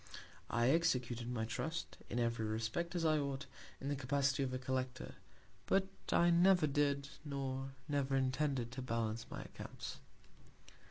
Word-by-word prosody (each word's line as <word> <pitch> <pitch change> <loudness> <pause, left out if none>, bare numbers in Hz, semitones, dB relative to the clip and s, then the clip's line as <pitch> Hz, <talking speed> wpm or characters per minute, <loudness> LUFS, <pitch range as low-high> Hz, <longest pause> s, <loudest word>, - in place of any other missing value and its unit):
I 120 +2 +3
executed 125 -7 +1
my 110 -2 -1
Trust, 160 +9 -3
in - - -2
every 115 -2 +1
Respect, 115 +11 -1
as 170 -2 +1
I 155 -1 +4
ought, 140 -1 -2 0.3
in 135 - -5
the 145 - +1
Capacity 140 +1 +1
of 135 -2 0
a 130 - -1
Collector; 130 0 -2 0.5
but 195 0 +3 0.2
I 175 0 +5
never 180 0 +6
did, 140 -1 +1
nor 135 -2 -3
never 140 -2 +1
intended 130 -2 +1
to 130 - -5
balance 115 -2 -1
my - - -5
Accounts. - - -7
135 Hz, 150 wpm, -37 LUFS, 125-150 Hz, 0.5 s, never